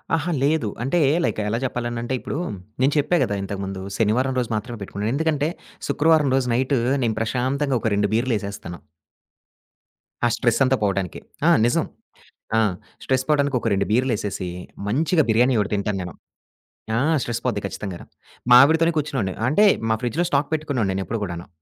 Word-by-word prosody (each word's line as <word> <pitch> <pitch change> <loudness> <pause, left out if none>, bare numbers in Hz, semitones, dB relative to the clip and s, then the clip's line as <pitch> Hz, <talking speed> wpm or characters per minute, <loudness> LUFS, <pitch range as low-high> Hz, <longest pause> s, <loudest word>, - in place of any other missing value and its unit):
అహా! 165 +2 -1
లేదు. 145 -6 +1
అంటే 135 +7 +1 0.2
లైక్ - - -1
ఎలా 115 +2 -1
చెప్పాలనంటే, 120 0 -3
ఇప్పుడు 140 - -5 0.4
నేను 140 +2 +3
చెప్పా 150 +5 +2
కదా! 100 - -1
ఇంతకుముందు. 95 -1 -5 0.2
శనివారం 120 +5 +1
రోజు 120 -2 -2
మాత్రమే 115 +2 -5
పెట్టుకున్నాను. 105 +3 -3
ఎందుకంటే 155 -1 +1 0.4
శుక్రవారం 155 -1 +3
రోజు 130 -2 0
నైట్ 130 +3 +1 0.3
నేను 110 -2 0
ప్రశాంతంగా 130 +4 0
ఒక 110 - +1
2 100 0 +1
బీర్లేసేస్తాను. 105 -7 -2 1.5
ఆ - - +5
స్ట్రెస్సంతా 130 +2 +2
పోవటానికి. 95 -3 -1 0.3
ఆ! - - +7 0.2
నిజం. 120 - +2 0.7
ఆ! - - +5 0.4
స్ట్రెస్ 130 0 0
పోవడానికి 145 -3 +2
ఒక - - -2
రెండు 100 0 +1
బీర్లేసేసి. 105 -6 0 0.4
మంచిగా 155 - +2
బిర్యానీ 120 +3 +4
1 105 +1 -3
తింటాను 100 -1 -1
నేను. 90 -2 -6 0.8
ఆ! - - +2 0.2
స్ట్రెస్ 120 0 -3
పోద్ది 120 -5 0
ఖచ్చితంగాను. 95 -3 -7 0.5
మావిడతోనే 160 +6 +6
కూర్చున్నోవాడిని. 135 -11 -1
అంటే 205 +10 +4 0.3
మా - - +3
ఫ్రిడ్జ్‌లో 155 +9 0
స్టాక్ 140 +1 +1
పెట్టుకున్నోడిని 140 -10 -1
నేను 95 0 -2
ఎప్పుడు 115 - -3
కూడాను. 85 -2 -5
120 Hz, 150 wpm, -22 LUFS, 105-140 Hz, 1.5 s, ఆ